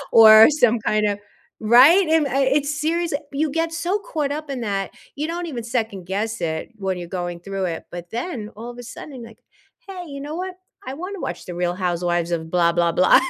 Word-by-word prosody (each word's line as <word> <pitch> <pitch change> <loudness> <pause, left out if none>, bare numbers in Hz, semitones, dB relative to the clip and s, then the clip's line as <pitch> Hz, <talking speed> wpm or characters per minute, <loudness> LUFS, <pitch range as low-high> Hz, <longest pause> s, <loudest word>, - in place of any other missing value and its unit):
or 220 0 +9
some 245 -6 +3
kind 215 0 +1
of 205 -1 -1 0.4
right? 260 - +7
And, 320 -2 +3
uh, - - -3
I 270 +3 +1
it's 285 +2 +1
serious. 335 0 0 0.2
You 295 +2 0
get 330 +2 -1
so 345 +5 -1
caught 305 -8 -3
up 305 0 -5
in 265 -2 -3
that. 200 -4 -2 0.2
You 295 +2 -2
don't 340 +2 -4
even 245 -8 -5
2nd 225 -6 -3
guess 210 +4 -3
it, 160 -1 -2
when 190 -3 -2
you're 175 -1 -7
going 175 -1 -4
through 195 +1 -4
it, 170 -2 -4
but 175 0 -8
then, 235 -3 -4
all 230 +3 -8
of 240 - -11
a - - -7
sudden, 255 +2 -9
like, 230 -1 -14 0.5
"Hey, 370 -2 -7
you 280 -1 -7
know 295 +2 -6
what? 370 +1 -5 0.3
I 260 - -4
wanna 365 +7 -6
watch - - -5
The 180 - -6
Real 175 0 -1
Housewives 175 -2 -1
of 160 -1 -3
blah, 170 -1 +3
blah, 170 0 +2
blah." 185 +2 +5
230 Hz, 220 wpm, -22 LUFS, 185-300 Hz, 0.5 s, or